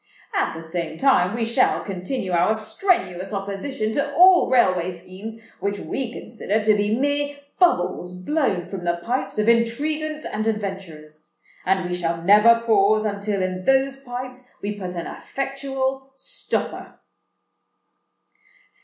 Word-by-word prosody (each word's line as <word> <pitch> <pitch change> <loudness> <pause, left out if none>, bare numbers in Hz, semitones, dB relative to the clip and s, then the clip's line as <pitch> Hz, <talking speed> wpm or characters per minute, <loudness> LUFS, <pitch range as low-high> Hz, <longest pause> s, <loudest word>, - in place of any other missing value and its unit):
At - - 0
the 165 - -7
same 160 -1 -4
time 225 -6 +3
we 235 -1 0
shall 235 +3 +2
continue 190 +2 -4
our 175 +5 +3
strenuous 220 - -1
opposition 205 +4 -3
to 280 +4 -1
all 365 +1 +7
railway 185 -8 +3
schemes 185 +5 -9 0.2
which 200 0 -1
we 250 +3 -4
consider 220 -3 -2
to 215 0 +4
be 210 +2 +1
mere 285 +1 0 0.2
bubbles 180 - +2
blown 200 - 0
from 190 -3 -6
the 170 0 0
pipes 245 +2 -2
of 210 +1 +1
intriguants 300 +7 +1
and 215 +1 -2
adventurers; 190 -8 -5 0.3
and 190 -1 +2
we 180 - -3
shall 170 -1 -1
never 215 +5 +6
pause 215 -1 +4
until 200 -1 -1
in 185 0 -3
those 270 0 +3
pipes 255 -1 -8
we 205 +1 -3
put 185 -3 -6
an 170 - -4
effectual 270 -1 -3
stopper." 265 - -3
215 Hz, 135 wpm, -23 LUFS, 185-265 Hz, 0.3 s, all